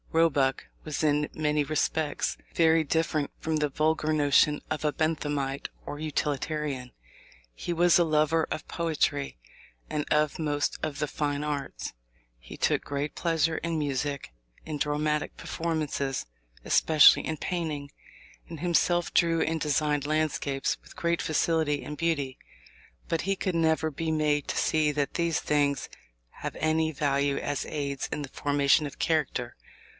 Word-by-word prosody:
Roebuck 145 -5 +2 0.2
was 155 0 -3
in 150 0 +2
many 150 -1 +1
respects 155 0 0 0.2
very 160 -1 +4
different 155 -1 0
from 160 -1 -1
the 150 -1 +1
vulgar 155 +2 +1
notion 150 0 +4
of 155 - -2
a 150 - +2
Benthamite 145 -3 -1 0.2
or 145 - -6
Utilitarian. 150 -3 -2 0.6
He 115 - -5
was 175 +1 +5
a 175 - +5
lover 155 0 +2
of - - -4
poetry 145 - -1 0.5
and 150 - -1
of 150 -1 +2
most 145 -2 0
of 145 -2 -3
the 150 - 0
fine 145 0 -2
arts. 140 - -4 0.5
He - - -11
took - - +1
great 145 +1 -3
pleasure 165 -2 +1
in 165 -1 -2
music, 140 - -2 0.3
in 155 -2 -4
dramatic 150 +1 -1
performances, 155 -5 -2 0.4
especially 155 -2 +6
in 160 - -2
painting, 150 -5 -3 0.6
and 165 -2 -7
himself 175 0 +1
drew 165 -1 +3
and 160 0 0
designed 150 -1 +1
landscapes 150 -3 0
with - - -16
great 170 0 0
facility 155 -2 +1
and 150 - -5
beauty. 145 -5 -1 0.7
But 165 - 0
he 195 +2 -1 0.2
never 160 -1 +2
could - - -22
be 165 -1 -1
made 150 -2 +1
to - - -2
see 155 -2 +2
that 145 -1 -1
these 170 -2 +1
things 145 -2 +1 0.5
have - - -4
any 160 0 +1
value 140 -1 +1
as 145 -1 -2
aids 140 -2 -3
in 150 - -3
the 140 - -7
formation 145 +2 +2
of 140 - -11
character. 150 -6 0
150 Hz, 145 wpm, -28 LUFS, 145-160 Hz, 0.7 s, especially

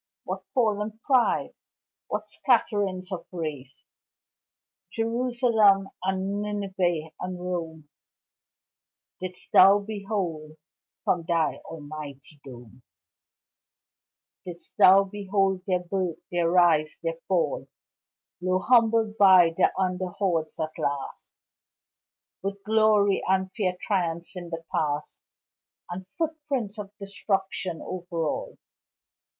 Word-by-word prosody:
What - - -4
fallen 215 -3 +1
pride! 255 -4 +2 0.5
What - - -3
scatterings 205 -7 +1
of 185 - -5
race! 150 -6 -6 1.1
Jerusalem 230 -4 +2
and 190 +2 -1
Nineveh 190 -6 -1
and 180 0 -5
Rome 165 -4 -5 1.3
Didst 185 0 -6
thou 195 +2 +8
behold 195 -7 -4 0.5
from 175 - +1
thy 165 -2 +1
almighty 150 -2 -9
dome 125 -2 -12 1.6
Didst 175 -1 -10
thou 195 +2 +8
behold 195 -1 0
their 180 -2 +1
birth, 180 -2 -2
their 175 -1 +1
rise, 170 -4 +3
their - - -2
fall - - 0 0.7
Low 185 +1 +1
humbled 225 -1 +3
by 185 -4 +7
the - - +3
under 185 0 0
hordes 170 -4 -1
at 155 0 -3
last, 140 -1 -3 1.1
With 195 +1 -4
glory 215 -2 +3
and 190 0 +1
fair 185 -3 0
triumphs 170 -3 -2
in 175 -1 -7
the 165 -1 -6
past, 150 -1 -2 0.7
And 185 +1 -6
footprints 280 -4 -3
of 200 -1 -6
destruction 195 -3 -2
over 175 -2 -4
all. 150 - -3
185 Hz, 100 wpm, -26 LUFS, 170-205 Hz, 1.6 s, thou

